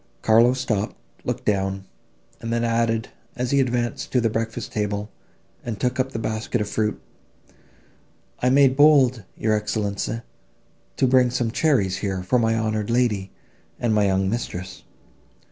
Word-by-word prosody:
Carlo 115 +3 +5
stopped, 110 -5 -2 0.3
looked - - -3
down, 95 -1 0 0.6
and 115 - -4
then 115 0 0
added, 115 -1 0 0.3
as 125 0 -2
he 140 - +3
advanced 125 +1 -1
to 125 - +3
the 115 -2 +1
breakfast 115 0 -3
table, 105 0 -2 0.5
and 115 -4 -5
took 125 0 -1
up 130 +1 0
the - - -4
basket 110 +2 -2
of 105 - -2
fruit, 105 0 -1 1.4
"I 125 - +2
made 135 0 +5
bold, 135 -5 +5 0.2
your 110 0 +1
Excellenza, 105 +2 -2 0.7
to - - +3
bring 125 -1 +4
some 120 -2 -1
cherries, 115 -10 +1
here, 95 -3 -3
for 125 +7 +2
my 115 -1 +2
honoured 110 -1 -1
lady 115 -6 +1 0.5
and 120 -2 +1
my 105 -1 +3
young 95 0 +1
mistress. 95 -4 -4
115 Hz, 150 wpm, -23 LUFS, 105-125 Hz, 1.4 s, Carlo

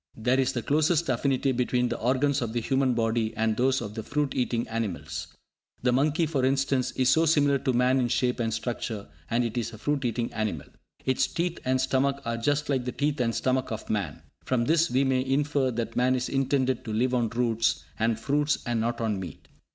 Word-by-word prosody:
There 125 +4 +1
is 130 0 +1
the 120 - -3
closest 155 +2 +2
affinity 135 +2 +1
between 125 0 +1
the - - -3
organs 130 +4 +1
of 115 -2 -3
the 120 - 0
human 130 +1 +1
body 115 -1 0
and 110 0 +1
those 130 +2 +2
of 105 -2 -6
the 110 - -4
fruit 145 +4 -1
eating 120 -2 -1
animals. 110 -5 -4 0.6
The 125 - +3
monkey, 150 +6 +2
for 145 -4 -1
instance, 135 -1 +1
is 130 -1 +2
so 160 +1 +4
similar 145 -3 +3
to 130 0 0
man 125 +2 +3
in 125 - +1
shape 125 +1 0
and 115 -1 0
structure, 110 -2 -4 0.2
and 120 +1 +2
it 120 0 -2
is 115 0 -4
a - - -8
fruit 145 +5 -1
eating 120 -1 -2
animal. 105 -9 -2 0.4
Its 130 0 +2
teeth 170 0 -2
and 130 0 +2
stomach 135 +1 +1
are 115 0 -1
just 145 +5 0
like 130 -3 0
the 125 - -2
teeth 145 0 -1
and 115 -2 0
stomach 130 -1 0
of 110 - -5
man. 100 -9 -3 0.2
From 120 -2 0
this 165 +3 +3
we 130 +2 +2
may 130 -1 +1
infer 140 0 +1
that 115 -2 -3
man 125 +1 +3
is 125 0 -2
intended 135 -2 0
to 110 - -4
live 125 +4 +1
on 120 -3 +1
roots 115 -1 0 0.2
and 115 0 +1
fruits, 145 +4 +1
and 120 -2 0
not 120 +1 -1
on 110 -4 0
meat. 90 -6 -9
125 Hz, 215 wpm, -27 LUFS, 115-135 Hz, 0.6 s, so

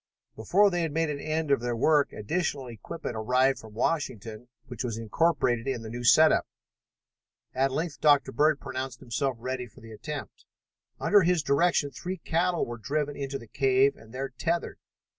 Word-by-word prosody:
Before 195 - +3
they 175 -1 0
had 165 -2 -1
made 165 -1 0
an 145 - -4
end 155 0 -2
of 140 - +4
the 120 0 -2
work 145 +4 +3
additional 145 - -2
equipment 120 +4 -7
arrived 125 +5 +2
from 110 -1 -13
Washington, 115 -5 -2 0.2
which 125 -2 -6
was 115 -3 -3
incorporated 120 0 +1
in 125 -4 -2
the 110 - -7
new 120 +1 -5
set 155 +6 +7
up. - - +1 1.1
At 135 +1 +1
length 155 +3 -3
Dr. 145 -2 +4
Bird 150 +3 +2
pronounced 130 -2 -5
himself 130 +1 -2
ready 130 +1 -4
for 120 +3 -18
the 115 -2 -12
attempt. 145 +6 -7 0.5
Under 205 0 +5
his 175 -2 +2
direction, 145 +1 +2
three 180 +9 -5
cattle 175 +1 0
were 120 0 -7
driven 145 +4 -2
into 135 0 -4
the 115 - -12
cave 135 +4 +2
and 110 0 -16
there 135 +2 -4
tethered. 170 +6 -2
135 Hz, 180 wpm, -27 LUFS, 120-155 Hz, 1.1 s, set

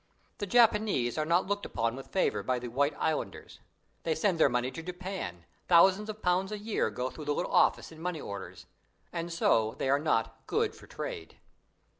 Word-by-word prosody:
The 205 - -3
Japanese 210 - +3
are 155 - 0
not 170 +2 +3
looked 205 +1 -2
upon 115 +1 -1
with 135 - -9
favor 190 - +1
by 130 -1 0
the 120 0 -5
white 145 +5 +1
islanders. 160 -1 -3 0.4
They 160 -1 0
send 170 +1 +1
their 150 - +6
money 125 +1 0
to 165 - -7
Japan 180 - -6 0.2
thousands 190 +4 +5
of 215 0 -7
pounds 180 +2 +1
a 210 - -3
year 210 - -1
go 125 +5 -3
through 155 - -9
the 145 0 0
little - - -2
office - - +3
in 160 0 -12
money 175 -2 -2
orders 100 -6 -7 0.5
and 170 0 -3
so 110 -9 +2
they 135 - 0
are 140 - +4
not 115 -7 -1
"good - - +1
for - - -15
trade". 80 - -6
160 Hz, 195 wpm, -30 LUFS, 125-190 Hz, 0.5 s, their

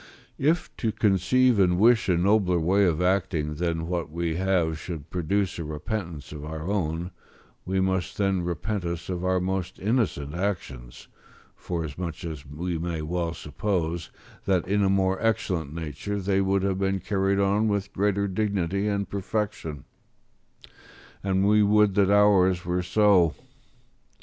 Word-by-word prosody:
If 160 +5 +1
to 115 - 0
conceive 110 +5 +3
and 90 -2 +4
wish 115 +1 +4
a 90 - +3
nobler 95 -1 +3
way 95 +5 +3
of 85 -1 +1
acting 90 -5 0
than 85 +1 -2
that 85 -4 -2
we 85 0 -2
have 90 -4 +1
should 80 -4 -7
produce 90 +2 -1
a - - -3
repentance 80 +1 -5
of 75 -1 -7
our 80 0 -6
own, 90 -3 -2 0.6
we 95 +1 0
must 95 -2 -1
then 95 -2 +1
repent 90 +4 -3
us 85 0 -4
of 90 -1 -3
our 95 0 +2
most 95 0 -3
innocent 100 - -1
actions, 80 -10 -4 0.5
forasmuch 85 0 -5
as 75 -4 -7
we 85 +4 -4
may 85 -2 -3
well 85 +1 -2
suppose 85 +2 -2 0.4
that 95 -3 +1
in 100 +2 +1
a 95 - +3
more 95 -1 +1
excellent 95 -9 0
nature 80 +6 -4
they 95 0 +1
would 95 0 +1
have 95 -1 0
been 95 0 0
carried 95 +1 0
on 100 +2 +2
with 100 -1 -1
greater 100 0 +1
dignity 100 -1 -1
and 100 -1 -1
perfection; 100 -7 -3 1.4
and 95 0 +1
we 105 +1 +5
would 105 -1 +4
that 100 -1 +3
ours 95 -3 +4
were 90 +1 0
so. 95 -3 +3
95 Hz, 150 wpm, -26 LUFS, 85-100 Hz, 1.4 s, we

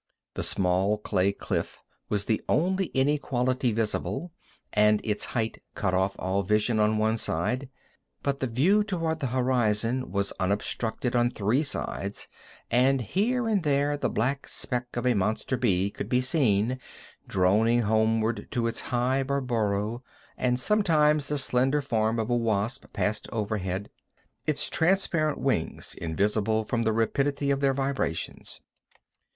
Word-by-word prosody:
The - - -3
small 95 +3 +2
clay 100 -2 +1
cliff - - -3 0.3
was 100 -1 -1
the 110 - 0
only 190 +4 +2
inequality 130 -3 +1
visible, 115 +9 -2 0.4
and 105 0 +4
its 105 -2 0
height 115 -2 -2
cut 95 -3 -1
off 95 +1 +1
all 95 +2 0
vision 105 +3 +1
on 105 0 +3
one 110 +1 +1
side. 125 +9 -1 0.5
But 140 -1 -1
the 130 - -1
view 170 - +3
toward 165 -6 -2
the 135 - -1
horizon 125 -1 +1
was 100 0 -1
unobstructed 110 +5 -1
on 120 0 +3
three 115 +4 +1
sides, 100 -8 -3 0.4
and 130 +3 +4
here 225 - 0
and 210 -3 +2
there 145 -1 +1
the 145 - -1
black 135 +5 -1
speck 125 -1 -3
of 120 - -2
a 125 - +4
monster 110 +5 0
bee 100 -6 +1
could - - -6
be 125 - +3
seen, 125 -3 +1 0.5
droning 110 +6 +3
homeward 110 +1 +1
to 120 -1 0
its 115 0 -1
hive 130 +2 0
or 140 0 +1
burrow, 110 -2 -1 0.3
and 125 0 +1
sometimes 150 -5 +3
the 150 - 0
slender 130 +2 +2
form 115 -5 0
of 110 +1 -1
a - - +3
wasp 115 +2 -1
passed 105 0 -1
overhead, 105 -3 -2 0.6
its 150 -2 +1
transparent 165 -3 +1
wings 130 -12 -1
invisible 105 +6 0
from 115 +2 -1
the 110 -1 +2
rapidity 140 +6 0
of 135 - +1
their 135 -1 +2
vibrations. 135 -11 -3
120 Hz, 145 wpm, -27 LUFS, 105-135 Hz, 0.6 s, and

